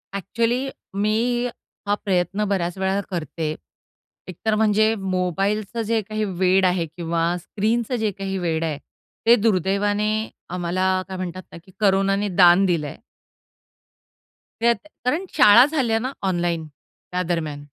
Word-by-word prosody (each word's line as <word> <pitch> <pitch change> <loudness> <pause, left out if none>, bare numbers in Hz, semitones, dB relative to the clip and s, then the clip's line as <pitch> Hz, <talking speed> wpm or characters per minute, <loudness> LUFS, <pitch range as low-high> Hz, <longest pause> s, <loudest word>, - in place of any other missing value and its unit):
Actually 230 +7 -1 0.4
मी 240 +3 +1 0.4
हा 205 - +2
प्रयत्न 190 +2 0
बऱ्याच 175 -2 -1
वेळा 190 +1 0
करते. 155 -2 -3 0.7
एकतर 215 +4 -2
म्हणजे 215 0 +3
मोबाईलचं 195 +3 -1
जे 225 -1 +2
काही 215 +1 -3
वेड 190 0 +2
आहे 180 -2 +1
किंवा 165 +1 -2
स्क्रीनचं 225 +7 -1
जे 210 - +1
काही 195 0 -4
वेड 165 -3 -1
आहे. 155 -3 -2 0.5
ते 235 +1 +7
दुर्दैवाने 205 +1 +1 0.4
आम्हाला 180 +1 -1 0.2
काय 190 -1 -6
म्हणतात 185 0 -5
ना, - - -10
की 190 - -19
कोरोनाने 195 0 +2
दान 180 +1 +6
दिलं 170 -5 0
आहे. - - -9 1.6
त्यात 235 0 +4 0.3
कारण 315 +9 0
शाळा 210 +4 +8
झाल्या 260 -7 0
ना 260 +3 -3 0.2
ऑनलाईन, 175 -3 -1 0.4
त्या 180 - -1
दरम्यान. 155 -4 -3
195 Hz, 130 wpm, -22 LUFS, 175-215 Hz, 1.6 s, शाळा